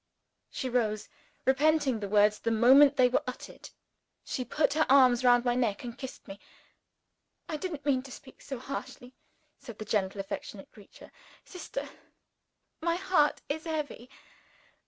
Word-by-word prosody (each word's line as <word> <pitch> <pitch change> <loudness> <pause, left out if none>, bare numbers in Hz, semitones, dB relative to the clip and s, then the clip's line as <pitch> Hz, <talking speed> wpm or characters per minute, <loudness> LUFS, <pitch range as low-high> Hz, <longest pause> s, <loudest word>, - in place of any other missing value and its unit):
She 260 - -4
rose, 220 -4 -1 0.4
repenting 280 -2 +2
the 200 -1 -5
words 210 +1 +3
the 230 - -2
moment 265 +5 +6
they 255 -1 +6
were 250 - +1
uttered 255 - -8 0.5
she 255 - -4
put 280 +3 0
her 315 +1 +1
arm 260 -2 +7
round 245 0 +4
my 245 - +2
neck, 240 -4 -1
and 240 -1 -7
kissed 265 0 -9
me. 195 0 -9 1.1
"I 315 - -4
didn't 305 -3 -5
mean 270 -3 +2
to 265 0 -13
speak 260 +1 -13
so 270 - -6
harshly," 250 0 -8 0.5
said 230 -3 -11
the 215 - -7
gentle 200 -1 -1
affectionate 195 0 -7
creature. 205 - -16 0.3
"Sister! 380 +7 -7 0.9
my 335 +1 0
heart 360 -5 +1
is 315 +3 -4
heavy. 300 -6 -5
255 Hz, 150 wpm, -29 LUFS, 230-290 Hz, 1.1 s, arm